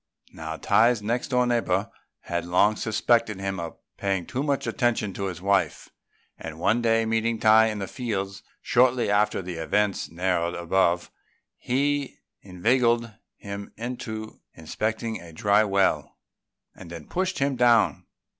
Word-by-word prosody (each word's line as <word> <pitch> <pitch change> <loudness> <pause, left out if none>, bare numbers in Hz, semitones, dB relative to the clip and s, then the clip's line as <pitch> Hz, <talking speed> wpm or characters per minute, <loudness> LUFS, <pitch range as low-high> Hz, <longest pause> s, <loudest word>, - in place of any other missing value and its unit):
Now 80 0 -6
Tai's 115 +3 +3
next 120 +4 -1
door 125 -1 +2
neighbour 110 -5 0 0.3
had 85 0 -3
long 90 +5 +3
suspected 110 -1 +1
him 95 -1 -3
of 85 -1 -6 0.2
paying 95 -3 -1
too 130 - -3
much 140 -1 -1
attention 120 -6 0
to 100 - -4
his 90 -2 -5
wife; 100 -1 0 0.5
and 80 -1 -7
one 105 +7 +2
day 115 -1 +2
meeting 115 +1 0
Tai 110 +1 +5
in 110 -1 -3
the 100 -1 -4
fields 100 -5 -4 0.2
shortly 125 -3 +3
after 105 -1 +1
the 90 -1 -6
events 105 +4 0
narrated 85 0 -1
above, 85 0 +1 0.5
he 140 +2 -1 0.2
inveigled 115 +4 +1 0.2
him 100 0 -8
into 110 -2 -6
inspecting 110 +7 -3
a 85 -1 -12
dry 100 +6 +3
well, 100 -2 0 0.6
and 90 - -12
then 85 -2 -9
pushed 185 0 -2
him 140 0 0
down. 120 -2 +3
105 Hz, 145 wpm, -25 LUFS, 95-120 Hz, 0.6 s, Tai